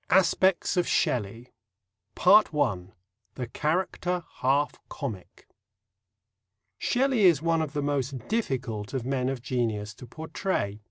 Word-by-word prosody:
XI. -, -, +6 dB
ASPECTS 185 Hz, 0 st, +2 dB
OF 175 Hz, -, +2 dB
SHELLEY 115 Hz, +1 st, -1 dB, 0.7 s
(1) 145 Hz, -, +4 dB, 0.4 s
THE 125 Hz, -, -3 dB
CHARACTER 175 Hz, +6 st, -1 dB
HALF 140 Hz, +2 st, +2 dB, 0.2 s
COMIC 110 Hz, -10 st, -7 dB, 1.3 s
Shelley 255 Hz, -4 st, +2 dB
is 165 Hz, -5 st, +5 dB
one 165 Hz, -1 st, +2 dB
of 155 Hz, -2 st, -3 dB
the 145 Hz, -1 st, -1 dB
most 140 Hz, -2 st, -1 dB
difficult 130 Hz, -, -2 dB
of 125 Hz, -3 st, -2 dB
men 130 Hz, -1 st, 0 dB
of 130 Hz, -3 st, -4 dB
genius 110 Hz, -5 st, -2 dB
to 120 Hz, +3 st, -12 dB
portray. 155 Hz, -, -3 dB
140 Hz, 120 wpm, -27 LUFS, 120-175 Hz, 1.3 s, XI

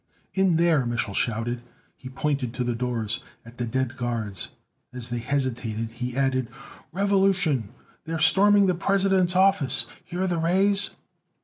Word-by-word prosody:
"In 190 Hz, -3 st, +3 dB
there!" 165 Hz, -4 st, +3 dB
Mich'l 120 Hz, -4 st, -1 dB
shouted. 120 Hz, +2 st, -1 dB, 0.3 s
He 130 Hz, -, -10 dB
pointed 130 Hz, -3 st, -2 dB
to 125 Hz, -, -1 dB
the 120 Hz, 0 st, -1 dB
doors, 115 Hz, -2 st, -2 dB, 0.3 s
at 115 Hz, +2 st, -14 dB
the 120 Hz, -, -1 dB
dead 130 Hz, +2 st, -2 dB
guards. 110 Hz, -7 st, -3 dB, 0.4 s
As 125 Hz, -1 st, -6 dB
they 120 Hz, 0 st, -2 dB
hesitated, 115 Hz, -4 st, -2 dB
he 125 Hz, +1 st, -5 dB
added: 130 Hz, -2 st, +1 dB, 0.4 s
"Revolution! 190 Hz, -, +2 dB, 0.4 s
They're 165 Hz, 0 st, -3 dB
storming 200 Hz, +6 st, +5 dB
the 185 Hz, -, +3 dB
President's 190 Hz, 0 st, +2 dB
office! 155 Hz, -9 st, +3 dB, 0.2 s
Hear 180 Hz, +2 st, -3 dB
the 175 Hz, -3 st, 0 dB
rays?" 195 Hz, +4 st, +2 dB
135 Hz, 140 wpm, -25 LUFS, 120-185 Hz, 0.4 s, storming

